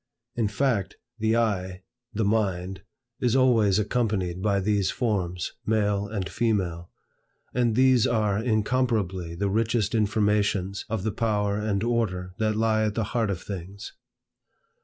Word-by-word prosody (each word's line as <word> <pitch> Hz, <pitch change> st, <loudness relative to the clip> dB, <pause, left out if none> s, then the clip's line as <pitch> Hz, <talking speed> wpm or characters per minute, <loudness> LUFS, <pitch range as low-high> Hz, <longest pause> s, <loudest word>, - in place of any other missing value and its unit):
In 115 Hz, -3 st, +1 dB
fact, 105 Hz, -1 st, -1 dB, 0.2 s
the 110 Hz, +1 st, +2 dB
eye, 95 Hz, -5 st, -1 dB, 0.3 s
the 110 Hz, -2 st, -1 dB
mind, 95 Hz, -3 st, -1 dB, 0.4 s
is 125 Hz, -1 st, +1 dB
always 115 Hz, -7 st, +4 dB
accompanied 105 Hz, -5 st, -1 dB
by 100 Hz, -1 st, +2 dB
these 100 Hz, -1 st, +1 dB
forms, 90 Hz, -7 st, -2 dB
male 105 Hz, -2 st, +1 dB
and 100 Hz, -3 st, -3 dB
female; 90 Hz, -7 st, -1 dB, 0.6 s
and 120 Hz, -3 st, +1 dB
these 130 Hz, -2 st, +4 dB
are 105 Hz, -3 st, +1 dB
incomparably 110 Hz, -6 st, 0 dB
the 100 Hz, +4 st, -1 dB
richest 110 Hz, 0 st, +1 dB
informations 105 Hz, -3 st, +1 dB
of 110 Hz, -3 st, -2 dB
the 110 Hz, -, 0 dB
power 105 Hz, -1 st, 0 dB
and 105 Hz, -1 st, -1 dB
order 95 Hz, -7 st, -1 dB
that 110 Hz, -1 st, +1 dB
lie 110 Hz, 0 st, +2 dB
at 105 Hz, -1 st, -1 dB
the 115 Hz, -, 0 dB
heart 115 Hz, -3 st, +1 dB
of 90 Hz, -3 st, -3 dB
things. 100 Hz, +1 st, -7 dB
105 Hz, 140 wpm, -26 LUFS, 95-115 Hz, 0.6 s, always